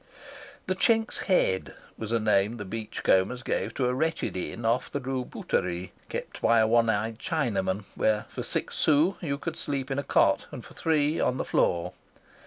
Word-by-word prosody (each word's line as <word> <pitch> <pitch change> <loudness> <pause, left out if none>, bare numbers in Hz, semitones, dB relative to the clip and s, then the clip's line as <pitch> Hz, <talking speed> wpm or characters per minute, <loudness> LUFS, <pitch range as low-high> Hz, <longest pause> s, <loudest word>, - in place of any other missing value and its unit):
The 185 - 0
Chink's 225 +4 +2
Head 95 - +1 0.2
was 110 -1 -6
a 115 - +2
name 105 +1 +2
the 105 - -6
beach 110 +3 -5
combers 105 +7 +2
gave - - -1
to 130 - 0
a 125 - +1
wretched 160 -1 -1
inn 90 - -4
off 115 +2 +1
the 145 - -2
Rue 130 -1 -2
Bouterie, 90 -6 -2 0.2
kept - - -6
by 115 0 +4
a 110 - +5
one 115 +1 +3
eyed 110 +1 -1
Chinaman, 105 - -1
where 110 -1 +1
for - - -5
six - - -2
sous 155 +5 +3
you 140 -5 -2
could 165 +2 -4
sleep 140 -2 -2
in 135 - 0
a - - -2
cot - - +3
and - - -8
for - - -13
three 155 -1 +1
on 125 - +1
the - - -2
floor. 85 -1 +1
120 Hz, 195 wpm, -27 LUFS, 105-145 Hz, 0.2 s, a